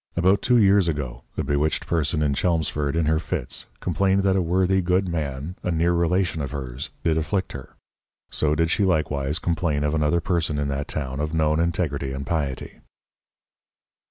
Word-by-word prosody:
About 95 +3 +3
two 125 -1 +4
Years 100 -4 +5
ago, 70 -6 -3
a - - 0
bewitched 75 +1 0
Person 80 -1 0
in 70 -2 +1
Chelmsford 75 -2 0
in 85 -1 +1
her 80 +1 +2
Fits, 65 -6 -3
complained 95 +2 +1
that 95 -1 +3
a 95 - +2
worthy 95 +2 +2
good 90 +2 +1
Man, 75 -1 -3
a - - -2
near 85 +1 +2
Relation 85 -1 +1
of 70 - -3
hers 65 -1 -5
did 80 -1 +2
afflict 85 +5 -1
her: - - -9 0.6
So 75 0 +1
did 80 +1 +1
she 105 - +2
likewise 75 -5 0
complain 85 -5 0
of 75 0 0
another 80 +2 +2
Person 85 -3 -1
in 70 -1 -1
that 70 +1 -3
town 65 -2 -4
of 75 +2 -2
known 80 0 +2
integrity 80 -6 -1
and 70 +1 -5
Piety. 70 -6 -3
80 Hz, 180 wpm, -24 LUFS, 75-90 Hz, 0.6 s, Years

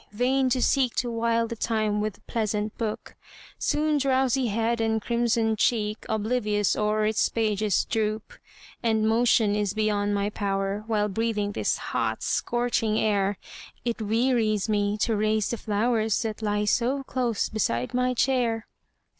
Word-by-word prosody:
vain 255 +4 +2
to 250 0 +1
seek 260 -4 +2
To 240 0 -1
while 230 0 +1
the 235 - -5
time 215 -2 0
with 210 -1 -5
pleasant 215 -2 -2
book, 220 -2 -4 0.5
Soon 300 0 +1
drowsy 265 -1 +2
head 230 +2 0
and 220 0 +1
crimsoned 230 -1 0
cheek 215 -2 0
Oblivious 215 -2 0
o'er 215 0 +1
its 215 0 +2
pages 215 -3 0
droop 215 -1 -2 0.5
And 220 -2 +1
motion 225 -2 +3
is 205 -1 -1
beyond 205 -1 +1
my 200 +1 -1
power, 195 0 -2
While 210 -2 +1
breathing 210 0 -1
this - - 0
hot, - - -2
scorching 240 -3 0
air, 200 -2 +1 0.5
It 235 -1 -2
wearies 220 -1 +1
me 205 -1 0
to 225 -1 +2
raise 215 0 +1
the 235 - -2
flowers, 220 +1 0
That 220 -1 -4
lie 210 -1 0
so 255 +5 +1
close 245 -5 -1
beside 125 - -1
my 250 0 +1
chair. 235 -3 +1
220 Hz, 145 wpm, -26 LUFS, 210-235 Hz, 0.5 s, motion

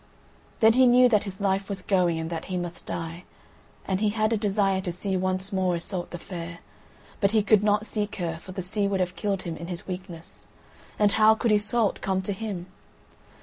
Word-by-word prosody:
Then 220 0 +7
he 255 +1 +5
knew 250 +1 +6
that 215 -3 +2
his 195 -1 -6
life 195 0 0
was 195 -2 -2
going, 180 -4 +2
and 160 +1 -4
that 165 -1 -4
he 185 -1 -3
must 175 -1 -6
die, 165 +2 -4 0.6
and 190 -1 -1
he 215 - +3
had 215 +1 +1
a - - +3
desire 200 -2 +1
to 185 -2 -3
see 190 +2 -3
once 185 +2 -1
more 185 -2 +1
Iseult 175 +1 -3
the 175 - -6
Fair, 170 -1 -7 0.6
but 200 - +3
he 215 0 +2
could 215 -1 +4
not 210 0 +2
seek 210 -2 -2
her, 165 -3 -3
for 185 - -10
the 185 0 -4
sea 200 +2 0
would 195 -1 -1
have 180 0 -1
killed 200 -3 -2
him 170 -2 -4
in 170 - -8
his 175 +1 -4
weakness, 180 -2 -8 0.5
and 205 -1 +4
how 220 +1 +5
could 230 0 0
Iseult 210 +1 +2
come 190 -1 -1
to 200 - -2
him? 195 -4 -5
195 Hz, 215 wpm, -26 LUFS, 180-210 Hz, 0.6 s, Then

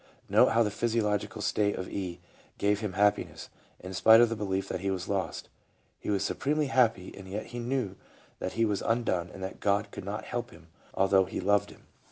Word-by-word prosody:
Note - - +5
how 115 +1 +3
the 105 - -1
physiological 105 -2 -1
state 105 -1 +1
of 95 - -5
E. 90 -3 -5 0.4
gave 100 0 +2
him 105 -3 -3
happiness, 105 +2 +1 0.3
in 95 +1 -8
spite 110 +5 +7
of 120 -1 +5
the 115 - -2
belief 95 -2 -2
that 95 - -3
he 100 +2 -2
was 95 -1 -3
lost. 100 -2 -2 0.5
He - - -6
was 100 -1 +1
supremely 150 +4 0
happy, 115 -7 +2
and 95 -1 -10
yet 100 +3 -4
he 120 - -7
knew 120 -5 -2 0.4
that 95 - -3
he 115 0 +2
was 105 -3 0
undone 110 -7 0
and 95 - -9
that 95 - -6
God 100 +1 +1
could - - -7
not 105 +3 -4
help 120 -1 -4
him, 85 - -17 0.3
although 95 0 +4
He 95 - -5
loved 100 +1 +2
him. - - -16
100 Hz, 210 wpm, -29 LUFS, 95-115 Hz, 0.5 s, spite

